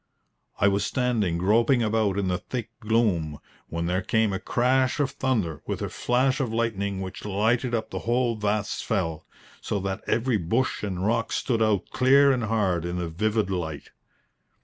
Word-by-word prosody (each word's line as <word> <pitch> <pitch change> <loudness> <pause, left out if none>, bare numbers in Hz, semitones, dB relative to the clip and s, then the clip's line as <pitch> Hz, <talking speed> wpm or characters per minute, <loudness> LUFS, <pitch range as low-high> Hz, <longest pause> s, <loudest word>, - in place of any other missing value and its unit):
I 100 - +4
was 100 0 +2
standing 110 -8 0
groping 115 +7 +3
about 110 -3 +1
in 100 -2 0
the 90 0 0
thick 120 0 -5
gloom, 105 - +1 0.3
when 85 +1 -3
there 90 +2 0
came 110 +1 +1
a 95 - -2
crash 130 +3 +1
of 140 -2 +1
thunder 105 - -1
with - - -2
a - - -2
flash 130 +2 +1
of 130 -5 -1
lightning 100 -4 -1
which 95 0 -7
lighted 115 +5 +1
up 110 - -3
the - - -3
whole 120 0 +1
vast 105 -1 -1
fell, 80 -8 -2 0.3
so - - -2
that 95 0 -3
every 120 0 +1
bush 115 +9 0
and 95 -2 -3
rock 115 +1 0
stood 115 -3 0
out 105 -4 +1
clear 140 +2 +5
and 125 -4 0
hard 100 -6 0
in 85 +1 -3
the 85 -2 -3
vivid 105 +4 0
light. 80 -5 -4
110 Hz, 175 wpm, -26 LUFS, 95-120 Hz, 0.3 s, clear